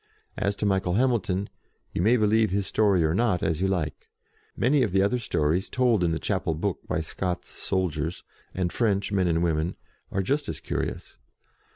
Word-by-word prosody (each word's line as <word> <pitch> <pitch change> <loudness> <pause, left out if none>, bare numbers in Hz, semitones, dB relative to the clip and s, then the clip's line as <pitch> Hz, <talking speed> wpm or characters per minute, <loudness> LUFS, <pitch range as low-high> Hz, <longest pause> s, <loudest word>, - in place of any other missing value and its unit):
As 100 0 -1
to 105 - -2
Michael 95 -3 +1
Hamilton, 105 -6 +1 0.5
you - - -1
may 115 +6 +4
be 110 - +2
lieve 110 +1 +3
his 100 +1 0
story 100 -5 +3
or 80 0 +2
not, 105 -3 +1
as 80 +1 0
you 95 - +2
like. 85 -6 -2 0.5
Many 135 +4 +3
of 105 -8 0
the 95 0 +4
other 125 +5 +1
stories 85 -4 0
told 120 -7 +2
in 85 - +2
the 80 - 0
chapel 90 -3 -1
book 95 +4 -2
by - - -1
Scots 90 +2 -3
soldiers, 85 -3 -2 0.3
and 90 -2 -2
French 100 -4 +1
men 95 -3 +2
and 85 0 +1
women, 80 +1 0 0.4
are 95 - 0
just 145 +8 0
as - - -4
curious. - - -4
95 Hz, 190 wpm, -26 LUFS, 85-105 Hz, 0.5 s, may